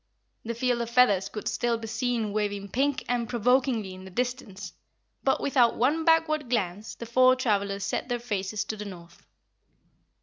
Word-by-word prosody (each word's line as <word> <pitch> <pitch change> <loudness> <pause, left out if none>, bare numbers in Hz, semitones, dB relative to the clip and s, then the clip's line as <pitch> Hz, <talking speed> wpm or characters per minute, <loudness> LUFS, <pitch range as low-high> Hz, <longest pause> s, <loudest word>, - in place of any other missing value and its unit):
The 235 +1 -4
field 245 0 0
of 230 - -3
feathers 205 -6 +4
could 210 - -6
still 240 -1 0
be 225 - -7
seen 230 -2 -1
waving 205 -1 -2
pink 275 +5 0
and 240 -1 -1
provokingly 245 -3 +1
in 185 0 -11
the 190 - -10
distance, 245 -2 -4 0.5
but - - +2
without 255 -4 +3
one 300 +7 +1
backward 310 -4 +3
glance 205 -3 -2
the 235 - -7
four 255 +2 +5
travelers 200 -5 0
set 195 - -2
their 245 - 0
faces 210 -3 -3
to 220 - -4
the 210 - -6
north. 170 -3 -12
235 Hz, 170 wpm, -27 LUFS, 200-250 Hz, 0.5 s, four